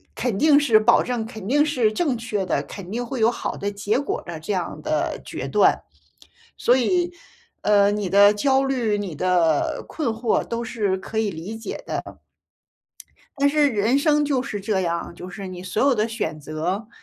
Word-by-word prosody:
肯 235 -6 -1
定 295 +2 +5
是 235 -7 +4
保 225 +2 +4
证 240 -3 -2
肯 220 -4 -8
定 290 +5 +3
是 245 -8 +1
正 275 -3 0
确 210 -4 -3
的， 145 -5 0
肯 190 +2 -9
定 240 +2 -2
会 265 0 -5
有 230 +2 +5
好 - - -4
的 200 +1 -3
结 205 +4 -1
果 285 - -3
的 165 -2 -6
这 200 +6 -3
样 180 -2 -3
的 - - -1
决 - - -5
断。 - - +3 0.8
所 245 +2 +3
以， 350 +7 +1 0.5
呃， 205 -1 +4
你 205 -3 -2
的 200 +1 +7
焦 270 +5 +2
虑、 235 -6 0
你 190 -6 -4
的 170 -3 +1
困 305 -6 -3
惑 225 +1 0
都 235 0 -4
是 205 -5 -1
可 220 +3 -5
以 215 -2 +1
理 180 +7 -7
解 225 - -6
的， - - -3
嗯。 - - -11 1.2
但 280 - +3
是 295 0 +3
人 230 +3 +2
生 295 0 +3
就 275 -3 0
是 215 -6 -5
这 195 -1 0
样， 170 -1 -3
就 180 +1 -9
是 195 +2 -7
你 180 -1 -8
所 185 +3 -1
有 275 -1 +4
的 215 0 0
选 160 -9 -4
择， 170 +8 -3
215 Hz, 210 characters per minute, -23 LUFS, 190-255 Hz, 1.2 s, 的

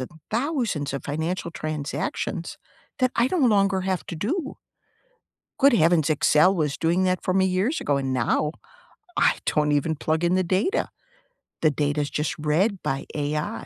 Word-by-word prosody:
and 130 - -5 0.2
thousands 235 - -1
of 140 - -5
financial 160 +4 -3
transactions, 155 -3 -4 0.4
that 255 -1 +2
I 240 +2 +2
no - - 0
longer 200 - +3
have 185 -1 -2
to 170 - -6
do. 275 - -3 1.0
Good 280 -1 +6
heavens, 165 -6 +3
Excel 155 +4 +4
was 150 -5 -1
doing 170 +3 +1
that 185 -1 +1
for 185 - -1
me 190 0 +3
years 190 - 0
ago, 145 - +1
and 135 -1 -2
now, 130 +5 0 0.6
I - - +3
don't 150 -1 +2
even 155 +2 +1
plug 155 +3 -1
in 175 +1 +2
the 185 - +3
data. 190 - 0 0.7
The 155 - +4
data 145 +1 0
is 145 - -2
just 150 0 -2
read 175 +7 0
by 135 +1 -2
AI. 150 +8 -2
170 Hz, 165 wpm, -24 LUFS, 150-195 Hz, 1.0 s, Good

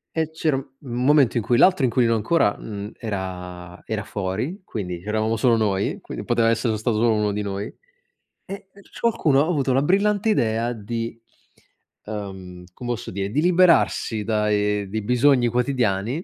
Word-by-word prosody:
E 160 -1 -1
c'era 160 -2 0
un 135 0 -4
un 125 -3 -4
momento 140 -4 +4
in 115 - 0
cui 120 +2 +2
l'altro 185 -3 +4
inquilino 120 -1 +2
ancora 110 0 +2
n 105 -1 -7
era 90 -4 -6
era 110 -2 -3
fuori, 105 - -4
quindi 90 - -5
c'eravamo 110 +3 -1
solo 115 +1 +3
noi, 100 -3 0
quindi - - -7
poteva 115 -1 +2
essere 115 0 0
stato 110 +1 -1
solo 115 +1 +3
uno 105 -1 +1
di 105 +1 -2
noi 100 0 -4 0.8
e 195 0 -8
e 200 - -16
c - - -15
qualcuno 160 -12 +3
ha - - -2
avuto 140 -6 +1
la 135 - +3
brillante 200 +6 +2
idea 115 - +1
di 115 +1 -5 0.9
ehm, 95 -4 -7
come 120 +4 -5
osso 120 - -5
dire, 100 +1 -3
di 145 - +1
liberarsi 170 -10 +3
dai 105 -1 0
dei 110 +2 -3
bisogni 125 +2 +3
quotidiani, 120 - 0
115 Hz, 170 wpm, -23 LUFS, 105-135 Hz, 0.9 s, momento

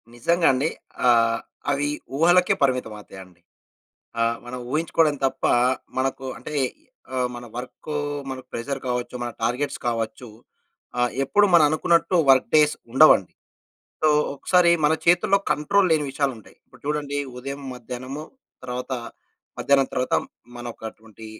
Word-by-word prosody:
నిజంగా 170 +8 +2
అండి. 135 +5 0 0.4
ఆహ్, 115 -1 +4 0.3
అవి 140 +1 0 0.3
ఊహలకే 175 +3 +4
పరిమితం 125 -5 +1
అవుతాయండి. 95 -3 -13 0.8
ఆహ్, 115 0 +1
మనం 125 +1 -6
ఊహించుకోవడం 155 0 +1
తప్ప 135 0 -4 0.5
మనకు 135 0 -2
అంటే 140 +6 -8 0.6
ఆహ్, 125 -1 +1
మన 120 0 -8
వర్కు 130 +4 -7 0.4
మనకు 130 -1 -7
ప్రెషర్ 135 +4 -3
కావచ్చు, 125 0 -3
మన 120 - -3
టార్గెట్స్ 125 +5 -1
కావచ్చు. 115 +1 -3 0.7
ఆహ్, 125 0 +2
ఎప్పుడు 205 +9 +4
మనం 165 -3 +7
అనుకున్నట్టు 170 +3 +2
వర్క్ 130 -2 +4
డేస్ 150 -1 +4 0.2
ఉండవండి. 135 - +6 0.7
సో 155 - +5 0.3
ఒకసారి 175 +4 +3
మన 150 - +4
చేతుల్లో 175 +3 +4
కంట్రోల్ 190 +6 +2
లేని 155 -2 +2
విషయాలు 140 0 0
ఉంటాయి. 110 - -17
ఇప్పుడు - - -20
చూడండి 145 -1 -2 0.2
ఉదయం, 140 +2 -6
మధ్యాహ్నము 125 +4 -7 0.4
తర్వాత 125 +1 -5 0.7
మధ్యాహ్నం 140 -1 +3
తరువాత 125 0 0 0.4
మనకటువంటి 110 -2 -9
135 Hz, 125 wpm, -23 LUFS, 120-150 Hz, 0.8 s, మనం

